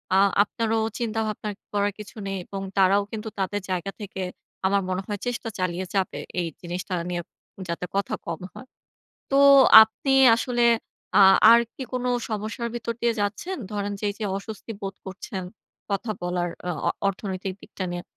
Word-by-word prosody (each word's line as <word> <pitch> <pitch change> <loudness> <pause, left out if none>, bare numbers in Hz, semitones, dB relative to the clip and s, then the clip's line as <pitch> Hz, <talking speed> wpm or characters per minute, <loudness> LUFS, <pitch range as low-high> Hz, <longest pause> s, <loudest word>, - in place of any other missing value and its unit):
আ - - +6 0.2
আপনারও 225 +1 -1 0.2
চিন্তাভাবনা 220 -2 -2 0.2
করার 205 0 +1
কিছু 210 - -10
নেই, 195 0 -2
এবং 195 -1 -6 0.2
তারাও 195 +1 +5
কিন্তু 220 0 -5
তাদের 200 +2 -1
জায়গা 185 +2 -2
থেকে 195 -2 -6 0.5
আমার 200 +1 +2
মনে 185 +1 -1
হয় 205 -1 -3
চেষ্টা 245 -1 -3
চালিয়ে 185 0 -1
যাবে। 190 -2 0 0.2
এই 175 - 0
জিনিসটা 180 +1 -5 0.2
নিয়ে 175 -1 -2 0.5
যাতে 170 +1 -3
কথা 200 0 0
কম 170 0 -4
হয়। 260 - -11 0.6
তো 275 - +3 0.4
আপনি 220 +5 -1 0.2
আসলে 240 0 0 0.5
আ - - +9 0.3
আর 235 0 +8
কি - - -7
কোন 250 -1 -2 0.3
সমস্যার 220 +2 -3
ভিতর 235 0 -3
দিয়ে 235 0 +2
যাচ্ছেন? 210 - -2 0.2
ধরেন 205 0 -2
যে, - - -5
এই - - -7
যে, 220 - -3
অস্বস্তি 215 +3 -7
বোধ 195 -1 -4
করছেন, 190 +1 -6 0.5
কথা 200 +3 -1
বলার 175 0 -1 0.2
অ - - +1 0.2
অ - - +3 0.2
অর্থনৈতিক 190 -1 -4
দিকটা 190 - -6
নিয়ে। 175 0 -4
200 Hz, 165 wpm, -25 LUFS, 190-225 Hz, 0.6 s, আ